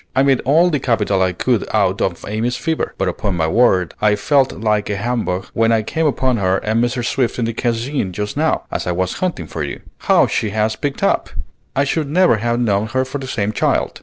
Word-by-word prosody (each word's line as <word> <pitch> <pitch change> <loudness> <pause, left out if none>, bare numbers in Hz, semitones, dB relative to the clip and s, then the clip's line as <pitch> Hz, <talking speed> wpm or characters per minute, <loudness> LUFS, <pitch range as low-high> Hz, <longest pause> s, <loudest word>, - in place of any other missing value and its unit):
I 135 - +4
made 135 -2 +3
all 165 +6 +4
the 145 - +1
capital 105 -6 +1
I 95 0 +2
could 115 +5 0
out 100 -2 +1
of 85 -3 -2
Amy's 115 +4 -1
fever; 160 -1 -2
but - - 0
upon 95 -4 -2
my 80 - +1
word, 95 -3 +3
I 105 -1 +4
felt 135 +5 +2
like 105 +3 -1
a 105 - -1
humbug 105 -4 -2
when 115 0 +2
I 110 -1 +2
came 160 +8 0
upon 130 -3 +1
her 95 -2 +1
and 110 +4 0
Mrs. 120 0 -1
Swift 125 -1 0
in 120 - 0
the 115 - -2
Cascine 120 -1 -1
just 105 +3 -4
now, 155 +2 +1
as - - -3
I 90 - 0
was 95 +1 -1
hunting 175 - -2
for 80 - -6
you. 70 -1 -4 0.2
How - - +4
she 110 - -1
has 110 +1 0
picked 140 +2 -4
up! - - +1 0.5
I 140 - +3
should 145 +1 -1
never 175 -6 +4
have 120 +2 -1
known 105 -3 +1
her 130 +3 0
for 130 +2 -5
the 135 - -6
same 105 -5 -1
child." - - 0
115 Hz, 230 wpm, -18 LUFS, 100-130 Hz, 0.5 s, I